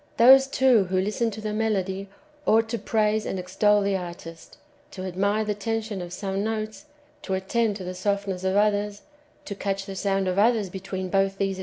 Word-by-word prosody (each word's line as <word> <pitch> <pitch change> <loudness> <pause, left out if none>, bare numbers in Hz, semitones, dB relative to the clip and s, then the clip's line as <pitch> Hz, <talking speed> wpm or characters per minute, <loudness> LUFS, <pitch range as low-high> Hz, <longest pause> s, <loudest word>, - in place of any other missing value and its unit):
Those, 265 +3 +8
too, 260 -6 +4
who 185 +1 0
listen 210 +4 0
to 215 0 -8
the 215 0 -3
melody, 200 -3 -1 0.4
ought 225 +1 +4
to 235 0 -2
praise 215 -1 +1
and - - -3
extol 205 +3 +2
the 200 0 +1
artist, 170 -2 -8 0.3
to 185 - -8
admire 200 +4 0
the 210 - 0
tension 215 -1 -3
of 175 -1 -7
some 195 +2 -3
notes, 215 +4 -4 0.4
to 190 - -2
attend 210 +3 0
to 195 - -7
the 180 0 -5
softness 195 0 -2
of 190 0 0
others, 205 0 +1 0.4
to - - -5
catch 195 0 -3
the 195 - -7
sound 195 -1 0
of 185 +1 0
others 215 -3 +2
between 190 0 -5
both - - -14
these 195 0 +3
extremes, 195 - -18
^ - - -28
Some 195 - +1
read 195 -1 -3
xx. - - -8
200 Hz, 215 wpm, -25 LUFS, 190-215 Hz, 0.4 s, Those